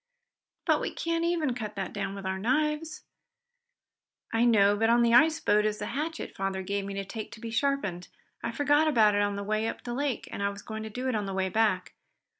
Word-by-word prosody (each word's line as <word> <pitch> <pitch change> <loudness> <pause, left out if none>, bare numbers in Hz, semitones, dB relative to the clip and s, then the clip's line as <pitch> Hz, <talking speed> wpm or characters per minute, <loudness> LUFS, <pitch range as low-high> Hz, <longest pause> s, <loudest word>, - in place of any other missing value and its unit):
"But - - +3
we - - -1
can't 335 0 -2
even 335 -6 +1
cut 215 -3 -5
that 195 -2 -4
down 195 -1 -3
with 195 -1 -7
our 190 0 -2
knives." 300 +7 0 1.3
"I 225 +1 +3
know. 205 -3 +5
But 225 +2 +2
on 235 +1 +5
the 235 0 +3
ice 315 +6 +6
boat 210 +1 +3
is 215 0 0
that 210 +1 -4
hatchet 320 +4 -4
father 195 0 -2
gave 200 +1 -2
me 200 0 -5
to 195 0 -3
take 215 +2 -6
to - - -11
be 230 0 -6
sharpened. 225 -8 -1 0.3
I 235 - -2
forgot 290 +5 +3
about 220 -8 +5
it 205 - +2
on 205 0 0
the 200 - -4
way 215 +2 0
up - - -5
the 240 - -4
lake, 275 0 -2
and - - -5
I 200 - +1
was 200 0 -9
going 220 0 -6
to 220 - -5
do 250 +4 -4
it 255 - 0
on 210 -2 -1
the 195 - -4
way 190 0 0
back. 210 -3 +1
220 Hz, 235 wpm, -28 LUFS, 200-260 Hz, 1.3 s, ice